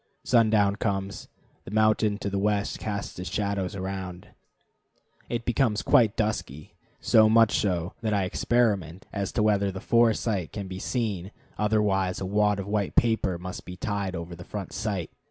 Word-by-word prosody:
Sundown 110 -4 +3
comes; 100 -2 -3 0.4
the - - -10
mountain 110 0 +2
to 100 - -3
the 100 - -1
west 105 0 0
casts 100 -4 -4
its 90 - -4
shadows 100 -2 -2
around. 95 -2 -5 1.0
It 120 -1 -3
becomes 115 -3 +1
quite 115 -7 +4
dusky: 90 - -3 0.3
so 110 -1 +5
much 115 -1 +5
so 90 -3 -1
that 110 -2 -1
I 100 -2 +2
experiment 95 -4 0
as 100 -2 -2
to 110 - +1
whether 100 -2 +2
the 95 - -6
fore 115 +1 +3
sight 100 -8 -2
can 100 -2 -5
be 95 0 -6
seen, 100 -6 -2 0.3
otherwise 105 -3 +1
a 95 - -3
wad 105 +1 +2
of 100 - -4
white 100 -1 -1
paper 110 -6 +2
must 90 +1 -7
be 90 - -8
tied 100 -1 -2
over 85 +1 -6
the 90 - -10
front 100 -1 -6
sight. 100 -6 -3
100 Hz, 170 wpm, -27 LUFS, 95-110 Hz, 1.0 s, so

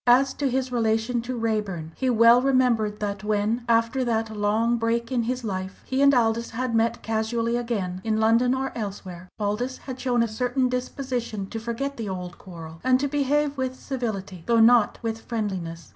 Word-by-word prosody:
As 260 +3 +5
to 280 -2 -1
his 260 0 -1
relation 230 0 +1
to 245 +1 -4
Raeburn, 210 -8 -2
he 260 - 0
well 235 +1 +6
remembered 245 -6 +2
that 200 -1 -3
when, 215 +3 0
after 230 +3 +2
that 225 -2 -1
long 220 +3 +1
break 230 +1 -1
in 250 -2 +1
his 250 +2 -2
life, 190 -2 -5
he 265 +1 -1
and 280 0 +7
Aldous 235 -2 +1
had 245 +1 -3
met 230 +1 +1
casually 230 +1 -1
again, 205 -7 -2
in 220 -1 0
London 230 +3 +3
or 265 0 -2
elsewhere, 190 -4 -6
Aldous 215 +5 -1
had 260 -1 -8
shown 245 -2 +2
a - - 0
certain 250 +3 0
disposition 250 -4 -3
to 225 - -3
forget 235 +5 -4
the 220 -3 -4
old 180 -2 -6
quarrel, 165 -3 -10
and 255 0 +4
to 285 - 0
behave 290 +1 +1
with 260 0 -2
civility, 205 -9 -4
though 235 -1 +4
not 230 0 +5
with 225 -1 -3
friendliness. 185 -9 -4
230 Hz, 185 wpm, -25 LUFS, 210-250 Hz, -, and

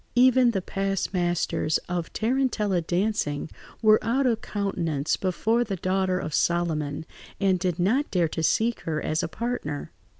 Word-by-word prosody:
Even 255 0 +6
the 195 -5 -1
past 195 0 -2
masters 175 -3 +1
of 175 -1 -3
tarentella 220 -6 0
dancing 175 -4 -1 0.3
were 215 0 +5
out 265 +4 +1
of 230 -3 +1
countenance 170 -8 -1
before 220 +5 +1
the 200 -5 -3
daughter 185 +1 0
of 155 - -4
Solomon, 160 -4 0 0.3
and 190 -2 +2
did 180 -2 -1
not 230 +11 +1
dare 175 -3 +2
to 160 - -3
seek 225 +8 +1
her 155 -2 -2
as 155 +1 -1
a - - -2
partner. 190 -8 -4
190 Hz, 155 wpm, -26 LUFS, 165-220 Hz, 0.3 s, Even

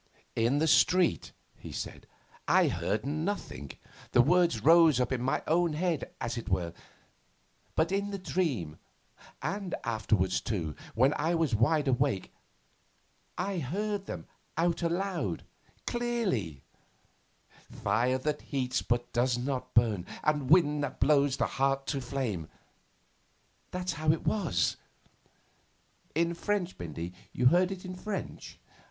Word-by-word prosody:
'In 115 +5 +2
the 155 - +2
street,' 180 +2 +3 0.2
he - - -10
said, - - -6 0.4
'I - - +5
heard 105 +3 -1
nothing; 150 - -3 0.4
the 120 - +7
words 170 -5 +3
rose 165 -3 +7
up 125 0 +1
in 130 -2 0
my 130 - 0
own 170 0 +2
head, 165 -1 -1
as 115 +1 -2
it 115 - -7
were. 90 -3 0 1.0
But 160 +3 +2
in 200 +1 0
the 200 - -3
dream, 145 - -2 0.6
and 195 -2 -2
afterwards 110 -5 +1
too, 80 - -3 0.2
when 130 +5 +4
I 165 +3 +1
was 160 -6 +1
wide 145 +7 +3
awake, 130 -6 0 1.0
I 195 -2 -1
heard 200 +7 -2
them - - -6 0.3
out 170 +1 +1
loud, 170 - -1 0.4
clearly: 200 - -1 1.1
Fire 125 +3 +1
that 150 +3 -2
heats 125 -3 -1
but 120 0 -1
does 125 0 +2
not 130 +1 -3
burn, 110 -6 +3 0.2
and 150 -4 +1
wind 150 -3 +5
that 145 - -4
blows 140 -2 +3
the - - +2
heart 135 0 0
to 140 -1 -2
flame 120 - -3 1.2
that's 180 0 -2
how 155 -1 +2
it 160 - -2
was.' 155 - +1 1.4
'In 170 +1 +2
French, 190 +1 -1
Bindy? 85 +1 -6 0.2
You 125 - 0
heard 180 +8 +5
it 190 -1 -6
in 185 - -5
French? 200 +2 -6
145 Hz, 135 wpm, -30 LUFS, 120-175 Hz, 1.4 s, the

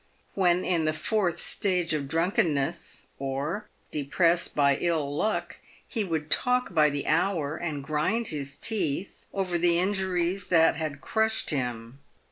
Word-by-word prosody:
"When 180 -2 +2
in 170 -3 +1
the 155 - +1
fourth 175 +2 0
stage 180 -5 +1
of 145 -3 -2
drunkenness, 160 -3 0
or 140 +10 -3 0.2
depressed 165 +4 +1
by 140 -2 +3
ill 155 -5 -1
luck, 175 -1 -1 0.3
he 220 - 0
would 160 -5 -3
talk 250 -5 +2
by 155 -2 +5
the 145 0 -3
hour, 160 -3 +1
and 155 -5 -4
grind 155 +11 0
his 140 -3 -4
teeth, 195 -4 -2
over 185 -3 -1
the 170 0 +3
injuries 185 -1 0
that 165 -2 +4
had 155 -2 -4
crushed 220 -3 0
him. 125 -2 -3
165 Hz, 140 wpm, -27 LUFS, 145-185 Hz, 0.3 s, by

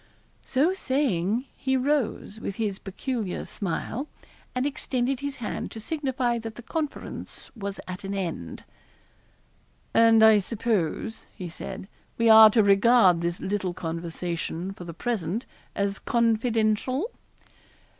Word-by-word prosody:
So 295 +8 +2
saying, 255 - 0
he 265 0 0
rose, 260 -5 -1
with 200 - -4
his 205 -3 -2
peculiar 210 0 -3
smile, 215 - -3 0.5
and 255 +1 0
extended 265 -3 -1
his 285 0 -4
hand 225 - -4
to 225 - -8
signify 260 -3 -1
that 225 -1 -7
the 240 - -10
conference 300 +3 -5
was 200 -3 -5
at 185 +2 -6
an 195 +1 -3
end. 165 - -4 1.3
'And 225 -1 +6
I 220 -1 +8
suppose,' 215 -1 -2
he 180 -4 -6
said, 190 +3 -7 0.3
'we 230 0 +3
are 220 0 +11
to 220 0 +4
regard 200 -3 +5
this 170 0 -2
little 190 -3 -2
conversation, 170 +2 -4
for 180 - -10
the 170 -2 -8
present, 220 -1 -2 0.3
as 200 0 -1
confidential?' 230 - +1
220 Hz, 125 wpm, -26 LUFS, 190-250 Hz, 1.3 s, are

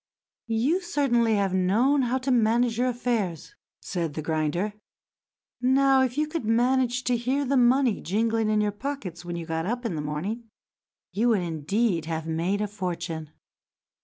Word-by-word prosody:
"You 250 +11 +1
certainly 240 - +2
have 195 -2 0
known 225 +10 +3
how 250 0 +1
to 260 +1 -2
manage 235 0 +2
your 250 - +2
affairs," 230 - -2 0.3
said 165 -5 -3
the 155 - -4
grinder. 160 +6 -1 0.9
"Now, 265 +1 +4
if 255 0 0
you 305 - +2
could 315 -1 -4
manage 245 +2 +2
to 250 - +1
hear 260 +4 0
the 275 +2 +1
money 250 -2 +3
jingling 225 +3 0
in 215 0 +2
your 210 0 +1
pockets 205 - -6
when 175 0 -5
you 170 -1 -5
got 160 +1 -2
up 245 +3 -3
in 225 - -1
the 155 - -3
morning, 195 +11 -4 0.6
you 230 +4 +2
would 215 -5 +3
indeed 170 +3 0
have 160 -1 -3
made 170 +5 -1
your 210 - 0
fortune." 170 -5 -4
225 Hz, 165 wpm, -26 LUFS, 175-250 Hz, 0.9 s, Now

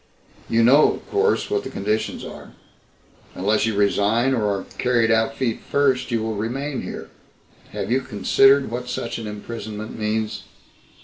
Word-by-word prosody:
You 115 0 +3
know, 140 +6 +6
of - - -11
course, 420 +1 +1
what 415 -1 0
the - - -6
conditions 105 +2 -2
are. - - -10 0.8
Unless 105 +3 +1
you 110 - -1
resign 105 +5 +2
or 115 -5 0
are 100 -1 -1 0.2
carried 120 -2 +2
out 110 0 +1
feet 115 -4 -1
first 135 -3 +1
you 115 -3 0
will 110 0 -2
remain 130 +6 -3
here... - - -7 0.6
have - - -4
you 130 +2 +2
considered 135 +4 +3
what 125 +1 -4
such 115 -1 -3
an 110 - -6
imprisonment 105 0 -7
means?" 110 0 -2
115 Hz, 160 wpm, -22 LUFS, 105-130 Hz, 0.8 s, know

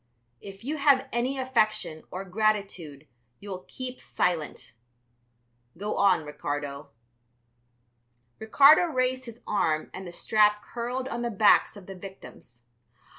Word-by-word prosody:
If 195 +1 -11
you 300 +5 -3
have 280 -2 +3
any 250 +3 -1
affection 215 -10 0
or 185 +2 -6
gratitude 190 -7 -2 0.3
you 205 - -9
will 185 -1 -7
keep 255 -1 -7
silent. 165 -8 -2 1.0
Go 205 +3 -3
on, 195 -6 +3
Ricardo." 145 -1 -5 1.5
Ricardo 280 +9 +6
raised 255 -4 -1
his 235 0 -11
arm 155 -7 0
and 190 -1 -7
the - - -7
strap 210 +3 +2
curled 245 +2 -4
on 235 -2 -4
the 240 - -1
backs 210 0 +4
of 195 - -12
the 195 - -8
victims. 155 -10 -13
210 Hz, 125 wpm, -27 LUFS, 180-250 Hz, 1.5 s, Ricardo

